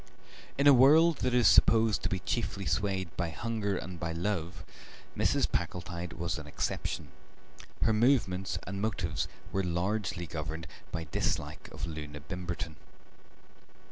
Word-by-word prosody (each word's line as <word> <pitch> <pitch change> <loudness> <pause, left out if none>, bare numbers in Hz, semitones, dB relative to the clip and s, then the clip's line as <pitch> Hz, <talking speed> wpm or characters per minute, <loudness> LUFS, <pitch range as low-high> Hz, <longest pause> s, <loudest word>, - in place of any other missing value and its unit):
In 140 - +2
a 145 - +9
world 155 +6 +6
that 125 - 0
is 120 -3 +5
supposed 110 +2 +5
to - - -1
be 95 - 0
chiefly 100 -5 -2
swayed 95 +1 -1
by 85 -2 -1
hunger 105 +1 -2
and 90 -2 -6
by 85 0 -2
love 90 0 -3 0.5
Mrs. - - +2
Packletide 85 -1 -3
was 85 -1 -2
an 75 - -9
exception; 75 - -3 0.7
her 110 - +4
movements 110 -6 +2
and 100 +1 -4
motives 95 -7 -1 0.2
were 95 - +1
largely 90 +1 -1
governed 80 0 -5 0.3
by 80 - -3
dislike - - -2
of - - -5
Loona 75 -3 -6
Bimberton. 85 0 -5
95 Hz, 140 wpm, -31 LUFS, 85-110 Hz, 0.7 s, a